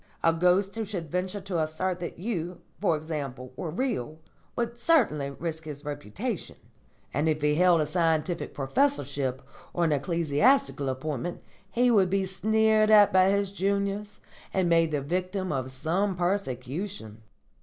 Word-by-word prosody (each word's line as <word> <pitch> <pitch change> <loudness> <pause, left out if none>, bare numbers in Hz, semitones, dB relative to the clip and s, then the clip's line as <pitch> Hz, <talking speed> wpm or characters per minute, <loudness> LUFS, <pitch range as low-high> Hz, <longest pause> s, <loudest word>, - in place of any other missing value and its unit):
A 165 - +5
ghost 180 +4 +2
who 225 - -3
should 180 -7 -5
venture 185 +3 -2
to 185 -3 -2
assert 165 +4 -1
that 175 - -6
you, 175 -3 -4 0.2
for 170 -6 +2
example, 140 -5 -5
were 165 - -4
real 160 - -2 0.4
would 235 -1 -2
certainly 235 - +2
risk 160 +2 -5
his 145 -1 -8
reputation, 145 -8 -4 0.6
and 150 +4 +1
if 155 -1 +1
he 150 0 +3
held 175 0 +4
a - - +1
scientific 165 0 0
professorship 140 - 0 0.3
or 175 - 0
an 165 - +2
ecclesiastical 155 - +2
appointment 145 +5 -4 0.3
he 245 +3 +3
would 195 -5 +4
be 195 0 +1
sneered 215 +3 +3
at 210 -3 +7
by 185 0 +6
his 200 0 +1
juniors 200 +1 -1 0.3
and 190 -2 +1
made 165 -1 +4
the 150 -2 -1
victim 185 +5 -2
of 130 -2 -2
some 170 +9 -1
persecution. 170 - -3
175 Hz, 150 wpm, -27 LUFS, 150-200 Hz, 0.6 s, at